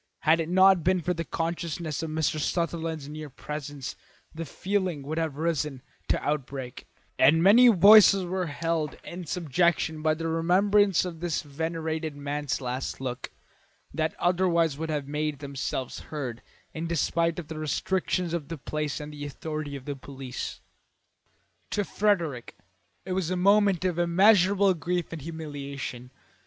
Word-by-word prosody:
Had 160 +2 +4
it 165 0 -2
not 190 -1 +5
been 185 +2 +3
for 180 +2 -1
the 165 -1 -3
consciousness 165 -1 -3
of 160 - -4
Mr. 155 0 0
Sutherland's 165 -2 -2
near 150 0 -7
presence 145 0 -6 0.4
the 165 +1 -5
feeling 185 -2 -2
would 155 +4 -3
have 160 -4 -2
risen 150 -5 -1 0.2
to - - +1
outbreak; 135 -3 -4 0.3
and 160 +4 +5
many 230 +6 +8
voices 200 -2 +8
were 180 0 -2
held 160 0 -2
in 175 -1 -8
subjection 165 0 +1
by 155 0 +2
the 165 +1 -3
remembrance 190 +4 +3
of 170 -3 -6
this 170 -2 -2
venerated 160 +1 -3
man's 145 0 -3
last 130 0 -4
look, 125 -1 -4 0.6
that 160 0 -1
otherwise 175 -3 +2
would 160 +2 -4
have 145 -3 -2
made 150 0 -2
themselves 135 -2 -4
heard 130 -6 -6 0.3
in 165 +1 -4
despite 170 0 0
of 170 -4 -6
the 160 -1 -6
restrictions 175 +3 -1
of 160 -5 -3
the 165 +1 -5
place 150 +1 -3
and 150 0 -7
the 145 -1 -7
authority 150 0 -5
of 135 -2 -9
the 145 - -4
police. 135 -1 -7 1.1
To 205 - 0
Frederick 170 - 0 0.5
it 190 - -5
was 185 -3 -1
a 185 - -1
moment 200 -1 +4
of 175 -2 0
immeasurable 190 +2 +5
grief 175 +1 -2
and 160 - -6
humiliation. 140 -5 -6
160 Hz, 150 wpm, -27 LUFS, 145-175 Hz, 1.1 s, many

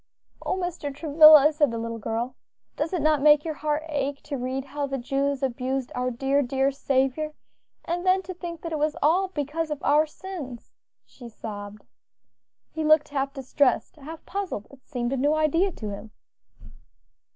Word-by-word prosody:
"O - - -1
Mr. 350 -5 -3
Travilla!" 305 0 +7
said 295 -2 +3
the 230 - -4
little 230 0 -4
girl, 230 +4 -3 0.4
"does 310 +2 -2
it 355 -6 -1
not 305 -2 +3
make 295 +1 +6
your 320 - -2
heart 300 0 -2
ache 285 -2 -2
to 290 - -5
read 260 +1 -3
how 285 +1 -3
the 275 0 -3
Jews 275 +2 -1
abused 260 0 -2
our 250 0 -1
dear, 270 +3 +1
dear 270 +1 +1
Saviour? 275 +2 0 0.5
and 350 +1 -2
then 375 +1 +3
to 370 +1 -6
think 340 -2 -7
that 335 - -5
it 310 - -2
was 300 0 0
all 355 +6 +3
because 310 -1 -3
of 300 - -2
our 305 +2 +4
sins," 300 -8 -8 0.3
she 240 -3 -12
sobbed. 205 -2 -8 0.9
He 320 - -3
looked 305 -1 +4
half 275 -1 -1
distressed, 270 0 0
half 310 +3 -10
puzzled; 380 - -4
it 275 -2 -18
seemed 245 -2 -2
a - - -1
new 290 +4 +2
idea 330 +5 +2
to 215 -7 -6
him. 205 +2 -8
285 Hz, 175 wpm, -25 LUFS, 260-310 Hz, 0.9 s, Travilla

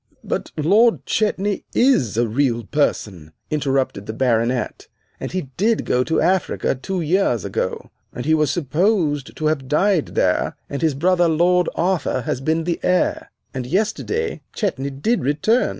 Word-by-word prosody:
"But - - -3
Lord 210 +10 +3
Chetney 205 -2 0
is 190 - +3
a 120 0 +2
real 120 0 0
person," 95 - -2 0.2
interrupted 135 -8 -1
the 110 - -4
Baronet, 120 0 0 0.3
"and - - -5
he 180 -8 -4
did 220 +4 +1
go 125 0 +2
to 160 - +1
Africa 185 +1 +1
two 180 +8 -4
years 160 - +1
ago, - - -3 0.2
and 125 - -6
he 155 - +3
was 155 -2 +2
supposed 155 - 0
to 155 - -3
have 155 -4 0
died 175 +3 +1
there, - - +1 0.2
and 140 - -3
his 160 -4 +1
brother, 175 +4 +3
Lord 175 +2 +3
Arthur, 170 -6 0
has 125 - -3
been 160 +3 0
the 170 0 -2
heir. 180 0 +1 0.2
And 130 -2 -4
yesterday 220 - -1
Chetney 140 - -2
did 145 - -1
return. 155 - +2
155 Hz, 155 wpm, -21 LUFS, 130-185 Hz, 0.3 s, Lord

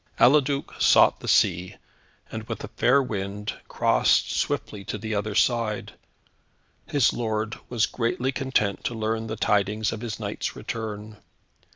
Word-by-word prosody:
Eliduc 140 +1 +3
sought - - +5
the - - -8
sea, 90 -1 +2 0.6
and - - -4
with - - -6
a - - -6
fair 135 +3 +3
wind, 105 -3 -4
crossed - - +2
swiftly 100 -2 -2
to 105 - -4
the 110 +1 -4
other 105 0 -2
side. 115 -3 +1 0.9
His 140 -5 +3
lord 110 -2 -2
was 115 -3 +2
greatly 125 +2 -1
content 130 -7 -1
to 120 - -2
learn 110 0 -2
the 110 - -3
tidings 105 +1 +1
of 110 - -6
his 115 -3 -5
knight's - - -4
return. 110 -1 -6
110 Hz, 145 wpm, -25 LUFS, 105-120 Hz, 0.9 s, sought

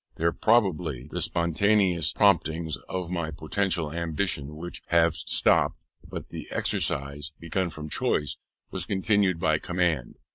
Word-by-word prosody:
There, 85 +1 +1
probably, 90 - +1
the - - -2
spontaneous 85 0 +2
promptings 85 -6 +2
of 90 -2 -3
my 85 -3 -2
poetical 80 0 -1
ambition 80 -3 -2
would 85 +3 -5
have 85 -1 +4
stopped; 80 - +2 0.3
but - - -8
the - - -7
exercise, 70 +2 -1
begun 85 +2 -1
from 75 -1 -7
choice, 75 -1 0 0.4
was - - -3
continued 100 -2 +2
by 80 -2 +2
command. 85 -9 -1
85 Hz, 130 wpm, -27 LUFS, 75-90 Hz, 0.4 s, have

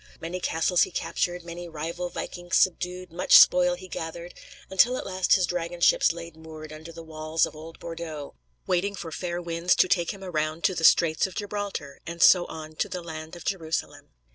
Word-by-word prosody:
Many 170 +3 -5
castles 175 +1 +1
he - - +3
captured; 175 0 -2
many 170 0 -8
rival 170 +3 -4
vikings 175 0 -4
subdued; 180 0 +1
much 175 +2 +6
spoil 180 0 +6
he 185 +1 -11
gathered; 170 0 -6 0.3
until 240 +7 +3
at - - -5
last 185 -1 +1
his 185 -2 +4
dragon 175 0 -4
ships 170 - +4
lay 170 0 -8
moored 155 -1 -11
under 160 +2 -10
the 165 0 -10
walls 155 0 0
of - - -10
old 160 +2 -10
Bordeaux, 165 -3 -7 0.3
waiting 190 +3 0
for 165 -4 -7
fair 175 +2 -3
winds 170 0 +1
to - - +4
take 175 -2 +1
him 195 -2 -10
around 155 -2 -2
to 190 - +3
the 165 - -4
Straits 160 +1 +5
of 190 - -12
Gibraltar, 205 -8 -5
and 170 +1 -6
so 175 0 +7
on 155 -1 -9
"to - - -1
the 180 -1 -5
land 160 0 -8
of 170 - -11
Jerusalem." 165 -5 -3
170 Hz, 195 wpm, -26 LUFS, 160-180 Hz, 0.3 s, so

